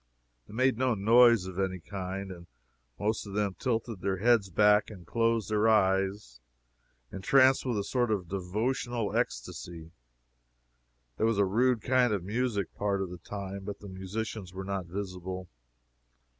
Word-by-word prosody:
They - - -11
made 130 -1 +2
no 130 -2 +2
noise 115 0 +5
of 95 0 -6
any 95 -1 -1
kind, 95 +1 -5
and 85 -1 -11 0.5
most 105 +1 -1
of 100 - -8
them 105 -2 0
tilted 115 -5 -2
their 95 -1 -1
heads 110 -1 +3
back 105 +3 +4
and 95 -5 -11
closed 115 0 0
their 105 +1 +3
eyes, 95 - +1 0.7
entranced 130 +7 +4
with 120 -4 0
a 100 - -1
sort 120 +3 0
of 100 -5 -1
devotional 110 +5 -2
ecstacy. 80 +7 -4 1.3
There 110 - +2
was 115 -2 +1
a 100 - +4
rude 115 +3 +2
kind 125 -2 +3
of 100 -4 -2
music, 105 -1 -2
part 100 -1 -1
of 90 - -6
the 90 - -8
time, 100 +1 -6
but 100 0 -6
the 100 - -10
musicians 95 0 -5
were 95 0 -5
not 95 -2 -3
visible. 95 0 -5
100 Hz, 155 wpm, -29 LUFS, 95-115 Hz, 1.3 s, noise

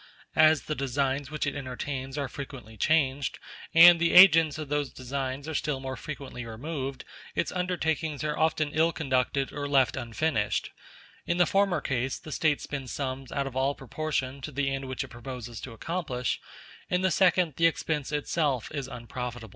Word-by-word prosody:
As 155 -1 +5
the 155 - -3
designs 140 0 -1
which 150 0 -2
it 140 - -1
entertains 135 0 -5
are 140 -2 -1
frequently 125 -5 -9
changed, 140 +1 +1 0.3
and 170 +1 +9
the 170 0 +2
agents 165 -5 +8
of 155 -1 -5
those 145 -1 -1
designs 135 +2 -4
are 160 - -4
still 145 -2 -1
more 130 0 -5
frequently 135 -2 -7
removed, 135 +3 -5 0.3
its - - 0
undertakings 160 -4 -1
are 150 -1 -1
often 155 -2 +1
ill 160 +2 +3
conducted 135 -2 0
or 145 -1 -4
left 135 -3 +3
unfinished: 120 -2 -1 0.6
in 175 - +1
the 175 - +5
former 195 -5 +2
case 135 -1 -1
the 155 - -10
State 150 -1 +1
spends 135 -3 -5
sums 135 -1 -4
out 140 -1 -1
of 135 -2 -6
all 135 +2 +1
proportion 135 -1 -3
to 150 - -6
the 135 0 0
end 135 0 -3
which 130 -1 -3
it - - -10
proposes 120 -1 -7
to 130 - -7
accomplish; 125 -1 -3 0.5
in 180 0 +1
the 190 -1 +2
second, 180 -2 +3
the 165 - +5
expense 155 -3 -2
itself 145 -4 0
is 140 -3 -4
unprofitable. 120 -2 -6
140 Hz, 175 wpm, -28 LUFS, 130-155 Hz, 0.6 s, and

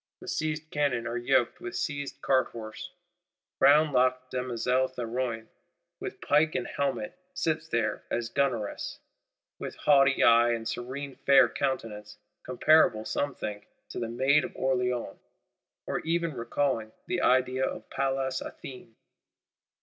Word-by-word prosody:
The - - -12
seized 155 0 -3
cannon 140 -5 0
are 120 0 -3
yoked 120 0 +1
with 120 0 -6
seized 145 -1 -4
cart 130 -2 +3
horses: 110 -2 -8 0.7
brown 150 +2 +5
locked 130 0 +2
Demoiselle 125 +1 0
Théroigne, 120 -2 -3 0.5
with - - -6
pike 150 +2 +2
and - - -1
helmet, 140 +2 -3 0.2
sits 160 0 -1
there 115 -6 -1
as 120 -1 -1
gunneress, 120 -7 -1 0.6
"with - - -6
haughty 140 -2 +4
eye 120 0 +6
and 115 -1 -4
serene 135 +3 -5
fair 140 +1 +5
countenance;" 105 -6 -4 0.2
comparable, 130 -4 +3
some 145 -1 -2
think, 105 -1 -6 0.2
to - - -5
the 115 -1 -3
Maid 135 +5 +3
of - - -7
Orléans, 125 -2 -1 0.7
or - - -2
even 170 0 -1
recalling 115 -2 -1
"the 180 -1 -1
idea 130 +1 +2
of - - -3
Pallas 135 -1 -1
Athene." 125 -4 -10
130 Hz, 135 wpm, -28 LUFS, 120-140 Hz, 0.7 s, eye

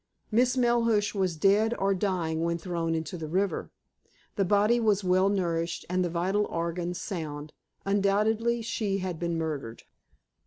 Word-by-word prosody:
Miss 250 +3 +3
Melhuish 230 -4 +2
was 185 -5 -1
dead 210 +7 +3
or 195 0 +2
dying 180 -5 -1
when 170 0 0
thrown 165 -1 -2
into 165 +3 -4
the 155 - -5
river. 190 +5 -1 0.7
The 200 - +2
body 210 +5 +3
was 210 -3 +2
well 185 +1 +3
nourished, 170 -4 -1
and 185 0 +2
the 175 - -1
vital 185 +5 0
organs 170 +1 -3
sound. 155 -6 -5 0.3
Undoubtedly 210 +4 +1
she 210 -3 -1
had 185 -4 -4
been 170 -1 -1
murdered. 145 -8 -4
190 Hz, 150 wpm, -28 LUFS, 170-210 Hz, 0.7 s, Miss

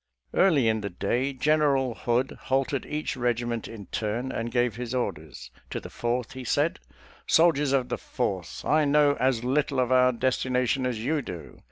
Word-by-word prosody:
Early 155 -11 +4
in 110 -1 +1
the 100 - -3
day 125 +9 -1
Gen 150 +4 +2
eral 135 -5 +1
Hood 125 +2 0
halted 135 +1 0
each 150 0 -3
regiment 120 -2 -1
in 105 -3 -9
turn, 115 +7 -3
and 115 +1 -3
gave 120 -2 +1
his 125 +1 -4
orders. 75 - -4 0.2
To - - -3
the - - -10
Fourth 120 0 -2
he 130 -1 -7
said, 145 +6 0 0.3
" - - -24
Sol 165 +1 +5
diers 145 -1 -1
of 130 -2 +1
the - - -2
Fourth: 95 -9 -4
I 155 0 +3
know 145 0 +4
as 130 -3 +1
little 140 +1 +1
of 125 0 +1
our 125 0 +5
desti 130 +1 -1
nation 125 +1 +1
as 125 -3 -2
you 150 +2 +1
do. 90 -9 -9
125 Hz, 195 wpm, -26 LUFS, 120-140 Hz, 0.3 s, Sol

